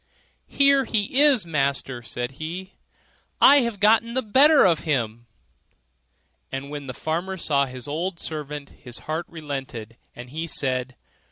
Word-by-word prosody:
'Here 275 -1 +3
he 220 +5 +1
is, 280 -9 +5
master,' 140 -5 -1
said 120 +2 -5
he, 180 +4 -6 0.7
'I 285 - +8
have 235 -5 -2
got 215 +2 +5
the 235 +3 -3
better 280 +8 +6
of 170 -4 +3
him': 120 -6 -2 1.2
and 135 +1 -5
when 145 -2 -6
the 125 - -6
farmer 175 +4 -3
saw 140 -5 +1
his 125 -1 -8
old 170 +4 -3
servant, 150 -2 -6
his 120 -2 -9
heart 160 +2 -3
relented, 135 -8 -7 0.2
and 120 +1 -10
he 160 +3 -4
said. 130 -4 -2
155 Hz, 145 wpm, -24 LUFS, 135-200 Hz, 1.2 s, I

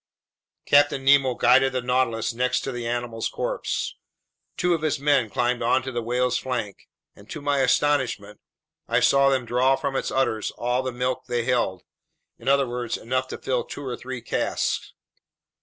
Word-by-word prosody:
Captain 145 -2 +3
Nemo 135 -2 +5
guided 130 +3 +4
the 130 - -1
Nautilus 125 -2 0
next 125 +2 0
to 135 - -4
the 120 -2 -5
animal's 120 -1 -2
corpse. - - -3 0.6
Two 180 0 +2
of 165 - -1
his 155 -2 0
men 140 -5 +2
climbed 120 +3 0
onto 130 +3 +1
the 120 -1 -2
whale's 125 +2 0
flank, 120 -6 -5 0.3
and 100 - -17
to 155 - -6
my 145 -1 0
astonishment, 130 -6 +1 0.5
I 115 +1 +2
saw 140 +3 +4
them 130 -2 0
draw 125 +3 +3
from 135 0 -3
its - - -1
udders 110 -5 0
all 125 +1 0
the 130 0 -3
milk 125 +1 -2
they 120 -1 -1
held, 115 -7 0 0.6
in 115 - -12
other 140 -1 +3
words, 120 -1 -3
enough 130 +2 -2
to - - -6
fill 125 -2 -1
two 145 - -8
or 125 -2 -3
three 130 -1 -7
casks. - - -2
125 Hz, 175 wpm, -24 LUFS, 120-135 Hz, 0.6 s, Nemo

